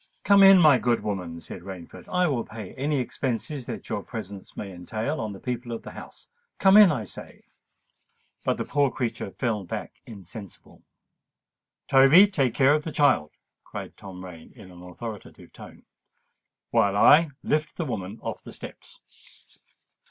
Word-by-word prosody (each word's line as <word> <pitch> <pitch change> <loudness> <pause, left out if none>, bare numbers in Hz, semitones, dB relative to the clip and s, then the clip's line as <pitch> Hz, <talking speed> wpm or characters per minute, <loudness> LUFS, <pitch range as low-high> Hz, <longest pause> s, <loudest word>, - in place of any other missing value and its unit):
"Come 200 -1 +6
in, 195 0 +9
my 150 -7 +6
good 120 -1 +1
woman," 90 -5 -4
said 85 - -9
Rainford. 90 -2 -10
"I 180 0 +2
will 135 -8 0
pay 110 -4 -9
any 145 +2 -1
expenses 130 +1 -3
that - - -7
your - - -3
presence 100 -3 -9
may 100 - -6
entail 110 - -4
on 110 -1 -4
the 100 - -9
people 125 +1 -5
of 115 - -6
the - - -9
house:—come 475 - -2
in, 210 -4 +9
I 125 -7 -2
say." 100 - -11 1.0
But - - 0
the - - -3
poor 145 -1 +2
creature 120 -5 -4
fell 110 -1 -2
back 85 - -7
insensible. 100 -1 -11 1.1
"Toby, 135 +8 +7
take 140 - 0
care 135 +1 +5
of 150 0 0
the 160 - -5
child," 145 - +2 0.3
cried - - -8
Tom 95 -1 -10
Rain 85 -3 -12
in 95 - -13
an 90 0 -14
authoritative 105 +4 -10
tone; - - -13 0.9
"while 100 -4 +2
I 155 +9 +6
lift 155 0 -1
the 170 - -2
woman 105 -5 -5
off - - -5
the - - -10
steps." - - -10
120 Hz, 160 wpm, -25 LUFS, 100-150 Hz, 1.1 s, in